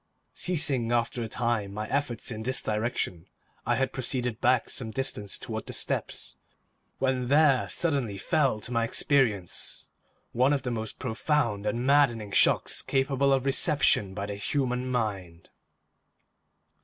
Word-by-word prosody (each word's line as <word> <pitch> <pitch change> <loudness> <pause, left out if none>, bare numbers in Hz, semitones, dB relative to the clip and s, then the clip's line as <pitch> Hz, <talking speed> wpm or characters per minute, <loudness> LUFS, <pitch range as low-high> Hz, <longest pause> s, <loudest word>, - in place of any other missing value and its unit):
Ceasing 140 -9 +1
after 120 0 0
a 115 - -3
time 115 -3 -1
my 105 +2 -4
efforts 135 -5 -1
in 110 -1 -5
this 130 +4 -1
direction, 105 -5 -2 0.4
I - - +3
had 135 0 -1
proceeded 125 -3 -2
back 125 -1 +3
some 115 -4 -4
distance 110 -5 -2
toward - - -6
the - - -6
steps, - - -2 0.6
when 130 -2 0
there 140 -7 +4
suddenly 130 - -1
fell 135 - +1
to 120 - -6
my 115 -1 +1
experience 115 - +1 0.4
one 130 +4 +3
of 140 - -1
the 125 - -2
most 110 -2 -4
profound 115 -4 -1
and 120 +4 -1
maddening 125 -7 +3
shocks - - +2
capable 135 0 +1
of 135 -1 +2
reception 135 -8 +2
by 100 - -3
the 100 - -5
human 125 +2 -1
mind. 100 -9 -3
120 Hz, 145 wpm, -27 LUFS, 110-135 Hz, 0.6 s, there